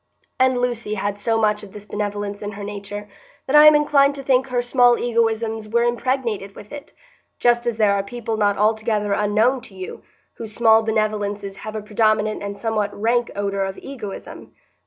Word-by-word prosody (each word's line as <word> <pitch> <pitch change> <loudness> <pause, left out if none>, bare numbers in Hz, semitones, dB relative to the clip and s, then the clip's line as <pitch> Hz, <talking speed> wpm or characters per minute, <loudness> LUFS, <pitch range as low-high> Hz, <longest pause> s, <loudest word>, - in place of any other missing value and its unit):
And 260 -1 +3
Lucy 240 -3 -2
had 205 0 -3
so 225 +2 0
much 210 -1 +1
of 200 -2 -12
this 210 -1 -10
benevolence 205 -1 -4
in 205 0 -5
her 200 0 -8
nature 205 0 -7 0.4
that 270 - 0
I 300 0 +9
am 305 - +8
inclined 285 -1 +3
to 275 - -7
think 260 0 +2
her 245 -1 -1
small 245 -1 +4
egoisms 225 -2 -1
were 235 +2 +2
impregnated 240 -4 -1
with 210 - -12
it, 290 -1 -9 0.5
just 240 0 +2
as 235 -2 -1
there 210 -2 +3
are 200 - +1
people 225 +2 -5
not 205 -2 +1
altogether 215 -1 +1
unknown 215 +6 +2
to 200 - -14
you 185 -1 -8 0.4
whose 220 -2 -7
small 225 -1 +5
benevolences 210 -2 -2
have 215 0 -7
a 215 - -4
predominant 215 0 +1
and 200 0 -5
somewhat 215 -3 -2
rank 235 +2 +1
odor 200 -1 -1
of 195 0 -4
egoism. 235 -8 -9
215 Hz, 185 wpm, -21 LUFS, 205-240 Hz, 0.5 s, I